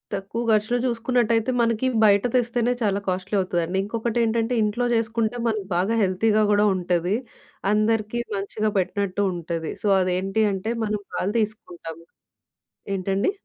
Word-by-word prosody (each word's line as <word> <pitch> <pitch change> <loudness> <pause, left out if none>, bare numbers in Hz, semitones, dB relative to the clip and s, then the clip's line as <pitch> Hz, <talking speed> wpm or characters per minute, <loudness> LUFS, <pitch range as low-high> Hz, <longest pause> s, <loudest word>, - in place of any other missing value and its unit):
తక్కువ 200 +4 -4
ఖర్చులో 215 +3 +2
చూసుకున్నట్టయితే 235 0 +1
మనకి 230 +2 +1 0.2
బయట 200 -1 +5
తెస్తేనే 240 0 +1
చాలా 200 -2 +1
కాస్ట్‌లీ 185 +2 -2
అవుతదండి. 180 0 -1
ఇంకొకటేంటంటే 230 +1 0
ఇంట్లో 215 +4 0
చేసుకుంటే, 225 +1 0
మనకి 215 -4 -2
బాగా 195 +6 +1
హెల్తీగా 210 +3 +2
కూడా 205 +1 +4
ఉంటది. 180 +2 0 0.6
అందరికీ 215 +1 +1 0.2
మంచిగా 210 +2 -2
పెట్టినట్టు 200 +1 -1
ఉంటది. 165 -1 -4
సో, - - +1
అదేంటి 190 +4 0
అంటే 195 +4 -3
మనం 210 0 -1
పాలు 200 +4 -1
తీసుకుంటాము 170 -6 -5 0.9
ఏంటండి? 195 - 0
210 Hz, 125 wpm, -24 LUFS, 190-230 Hz, 0.9 s, బయట